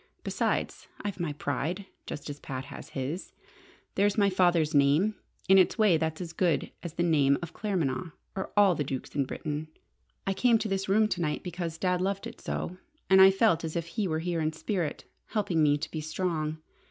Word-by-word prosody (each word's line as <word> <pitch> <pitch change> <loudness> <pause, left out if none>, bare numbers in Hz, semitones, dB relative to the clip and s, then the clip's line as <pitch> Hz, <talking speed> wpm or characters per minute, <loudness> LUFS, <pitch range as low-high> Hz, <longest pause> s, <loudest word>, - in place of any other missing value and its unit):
Besides - - -1 0.2
I've 205 -2 -4
my 170 -4 -1
pride, 150 +7 -2 0.2
just 145 - -6
as 145 -1 -6
Pat 130 -1 -5
has - - -10
his. 140 +8 -4 0.6
There's 200 +1 +2
my 200 -2 +4
father's 175 -4 +3
name. 145 +9 +4 0.3
In 190 +1 +7
its 185 - +3
way 210 -6 +5
that's 160 0 -1
as 170 -2 -6
good 170 -5 +1
as 170 -3 -6
the 170 - 0
name 145 -5 +4
of 170 - -6
Claremanagh, 180 -5 -1 0.2
or 190 - -4
all 200 -3 +6
the 150 - -1
dukes 130 -2 -5
in 140 - +1
Britain. 150 +3 -4 0.6
I 195 - +1
came 235 +3 +4
to 220 0 -2
this 195 -1 -2
room 215 +2 +4
to 180 - -1
night 150 -3 -1
because 170 -2 -4
Dad 180 0 +1
loved 195 +1 -1
it - - -9
so, 180 - -4 0.3
and 190 0 +8
I 190 - +10
felt 195 -4 +3
as 160 -1 -4
if 170 -1 -2
he 210 +1 -1
were 160 -2 0
here 170 -1 -1
in 155 0 0
spirit, 175 -1 -3 0.2
helping 195 -7 0
me 145 -1 +4
to 155 - -5
be 160 - -3
strong. 155 -1 -2
170 Hz, 200 wpm, -29 LUFS, 155-190 Hz, 0.6 s, I